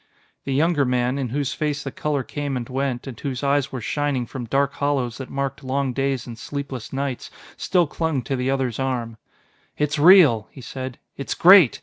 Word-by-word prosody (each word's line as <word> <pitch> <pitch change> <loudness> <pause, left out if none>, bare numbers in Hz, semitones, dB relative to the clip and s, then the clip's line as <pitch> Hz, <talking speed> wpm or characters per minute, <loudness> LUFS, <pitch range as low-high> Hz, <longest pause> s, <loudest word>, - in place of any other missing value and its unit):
The 135 - -1
younger 155 0 +3
man, 125 +1 0
in 130 -3 -2
whose 140 +2 -1
face 150 -2 -2
the 135 - -5
color 145 -3 -2
came 145 0 -3
and 120 -2 -5
went, 130 -1 -2
and 135 -4 -8
whose 135 -2 -4
eyes 140 -1 +1
were 130 - -5
shining 145 0 -1
from 125 +1 -6
dark 140 +4 +1
hollows 135 -4 -1
that 130 - -7
marked 135 0 -3
long 135 0 -1
days 135 -1 -1
and 115 -2 -9
sleepless 135 -3 -6
nights, 135 -2 -3 0.3
still 180 -3 +2
clung 155 -3 -2
to 135 - -2
the 125 +1 -1
other's 135 -4 -1
arm. 120 -4 -2 0.6
"It's 150 +1 0
real," 150 - +7
he 130 - -12
said; 130 +1 -6 0.2
"it's 140 -5 -3
great! 180 - +7
135 Hz, 195 wpm, -23 LUFS, 125-145 Hz, 0.6 s, real